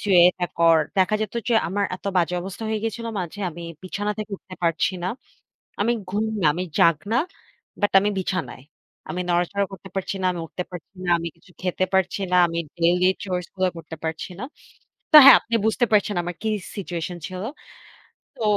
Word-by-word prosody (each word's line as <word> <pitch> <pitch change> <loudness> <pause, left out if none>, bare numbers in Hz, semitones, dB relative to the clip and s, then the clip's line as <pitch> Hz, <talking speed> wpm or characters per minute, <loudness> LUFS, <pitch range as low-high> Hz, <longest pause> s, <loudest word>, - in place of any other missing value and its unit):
তুই 195 -3 +4
এটা 180 0 -2
কর 165 -1 +6 0.2
দেখা 190 +3 +3
যেত 215 +1 -3
যে, 235 - +3
আমার 200 +3 0
এত - - -27
বাজে 180 0 +2
অবস্থা 195 +3 -7
হয়ে 220 0 0
গিয়েছিলো 230 +1 -3
মাঝে 180 +4 -6
আমি 170 +1 -9 0.2
বিছানা 205 +3 -2
থেকে 215 0 -5
উঠতে 185 0 -12
পারছি 170 +2 +1
না। 180 - -1 0.7
আমি 230 +4 +3 0.2
ঘুম 210 +3 0 0.2
না, 160 - +3
আমি 180 +3 -2
জাগ্না, 170 +8 +3 0.6
বাট 205 - +1
আমি 205 +1 +1
বিছানায়। 170 -10 -3 0.5
আমি 180 - -3
নড়াচড়া 180 +3 +1
করতে 190 0 -10
পারছি 195 0 -2
না, - - +2
আমি 175 - -5
উঠতে 180 +2 -5
পারছি 180 +2 -10
না। 180 - -4
আমি 170 0 -3
কিছু 175 +2 -22
খেতে 185 0 0
পারছি 190 +1 +1
না। 180 - +3
আমি 170 0 -4 0.2
ডেইলি 175 +2 +3 0.2
চরস 180 -2 -3
গুলো 185 0 +2
করতে 165 0 -8
পারছি 160 +4 -4
না। 250 - -4 0.7
তো, 310 - +11
হ্যাঁ, - - +11
আপনি 230 - -5
বুঝতে 220 +3 +2
পারছেন 205 0 +3
আমার 175 +1 -4
কি 220 - -1 0.3
সিচুয়েশন 175 -3 -4
ছিল। 185 0 -6 0.9
তো 240 - -5
185 Hz, 185 wpm, -23 LUFS, 175-205 Hz, 0.9 s, তো